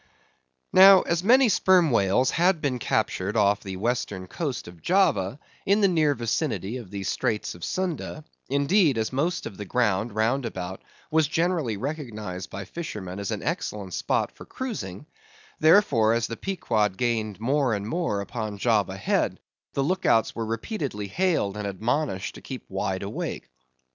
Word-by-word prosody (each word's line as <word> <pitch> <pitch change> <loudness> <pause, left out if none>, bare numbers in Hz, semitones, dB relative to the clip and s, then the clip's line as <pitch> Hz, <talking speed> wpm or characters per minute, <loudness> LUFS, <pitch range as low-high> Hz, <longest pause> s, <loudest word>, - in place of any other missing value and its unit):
Now, 190 0 +9
as 170 +1 -1
many 255 +5 +6
Sperm 185 -6 +4
Whales 115 +4 +3
had 175 0 +3
been 135 -4 -1
captured 100 -1 -1
off 100 -1 +3
the 95 -1 -6
western 105 -3 -2
coast 135 - -4
of 85 -2 -12
Java, 155 - +2 0.3
in 200 +2 +3
the 200 - +6
near 155 -5 +2
vicinity 115 - -2
of 115 -7 -9
the 100 0 -5
Straits 105 +2 -1
of 85 - -12
Sunda; 175 -4 -3 0.3
indeed, 140 - +3
as 110 +3 -1
most 165 +7 -1
of 95 - -7
the 105 - -5
ground, 110 -1 0
roundabout, 110 -6 -1 0.3
was 160 -1 +3
generally 160 - 0
recognised 110 - -5
by 100 - -6
the 95 - -17
fishermen 100 - -6
as 100 - -4
an - - -3
excellent 100 -4 -3
spot - - 0
for - - -13
cruising; 150 - -5 0.5
therefore, 145 - +5
as 115 0 0
the 115 - -5
Pequod 110 - -1
gained 110 -4 -1
more 130 0 +1
and 100 0 -4
more 115 - -1
upon 110 0 -5
Java 100 -4 +1
Head, 100 - 0 0.3
the 140 - 0
look 185 +6 0
outs 115 - +3
were 115 -1 -4
repeatedly 115 - -3
hailed, 165 - 0
and 105 -1 -3
admonished 110 +1 -1
to - - -11
keep 130 -2 -8
wide 95 0 -2
awake. 100 -9 -4
115 Hz, 165 wpm, -26 LUFS, 100-155 Hz, 0.5 s, Now